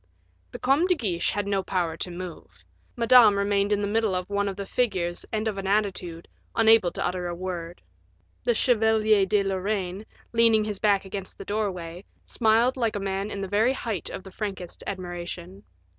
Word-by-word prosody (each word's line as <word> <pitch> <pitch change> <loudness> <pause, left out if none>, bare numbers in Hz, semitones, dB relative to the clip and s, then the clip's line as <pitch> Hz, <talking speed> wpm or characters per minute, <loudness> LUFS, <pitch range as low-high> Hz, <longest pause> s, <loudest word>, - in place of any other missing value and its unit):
The - - -6
Comte 280 +8 +2
de 360 - +4
Guiche 185 - -1
had 205 0 -1
no 200 -1 0
power 175 -4 -1
to 180 - -5
move; 175 - -9 0.3
Madame 230 -3 +6
remained 200 0 +1
in 205 0 +2
the 205 - 0
middle 215 -2 +1
of 180 0 -2
one 200 0 +1
of 195 - -3
the 200 0 -5
figures 185 -7 -1
and 220 0 -1
of 205 -3 -2
an 195 - -4
attitude, 190 -5 -1 0.3
unable 225 -4 +5
to - - -2
utter 180 0 -2
a 175 - -4
word. 175 -1 -6 0.6
The 240 - +2
Chevalier 220 -4 +3
de 205 0 +2
Lorraine, 195 0 -2 0.3
leaning 230 -2 +5
his 210 -2 -4
back 200 -2 +2
against 190 0 -7
the - - -9
doorway, 185 -4 -3 0.2
smiled 235 +3 +2
like 230 -4 0
a - - -1
man 195 +1 -2
in 200 - -5
the 195 - -3
very 215 +6 +2
height 225 - -3
of - - -7
the 190 - -11
frankest 195 -3 -6
admiration. 175 - -6
200 Hz, 190 wpm, -26 LUFS, 185-220 Hz, 0.6 s, Madame